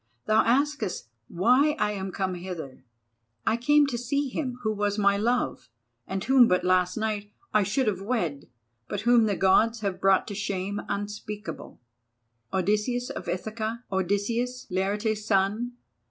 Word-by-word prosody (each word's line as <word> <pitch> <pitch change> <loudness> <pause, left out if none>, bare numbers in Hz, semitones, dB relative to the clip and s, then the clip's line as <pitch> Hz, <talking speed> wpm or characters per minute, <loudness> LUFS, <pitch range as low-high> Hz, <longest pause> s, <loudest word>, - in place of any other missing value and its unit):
Thou 215 +1 +4
askest 245 - 0 0.2
why 250 - +3
I 210 - +1
am 195 -2 -4
come 190 0 -2
hither. 175 -8 -7 0.6
I 225 - +3
came 295 +5 +4
to 245 -4 -3
see 280 +3 -1
him 255 -2 -3
who 215 -1 +1
was 205 0 -1
my 200 -1 +4
love, 240 +5 -1 0.4
and 190 0 -3
whom 260 -2 +6
but 180 -2 +2
last 185 +1 +2
night 210 -2 -2 0.2
I 215 - +5
should 210 +7 +1
have 200 -4 -1
wed, 185 - -2 0.4
but 205 - -3
whom 235 0 +5
the 205 -2 +1
Gods 215 +5 +3
have 195 -3 -3
brought 195 -1 +4
to - - -4
shame 200 0 -3
unspeakable, 210 +1 -5 0.7
Odysseus 210 +6 0
of - - -7
Ithaca, 220 +5 -3
Odysseus, 230 +7 -1
Laertes' 205 +3 -1
son. 210 +4 +1
210 Hz, 150 wpm, -27 LUFS, 190-235 Hz, 0.7 s, whom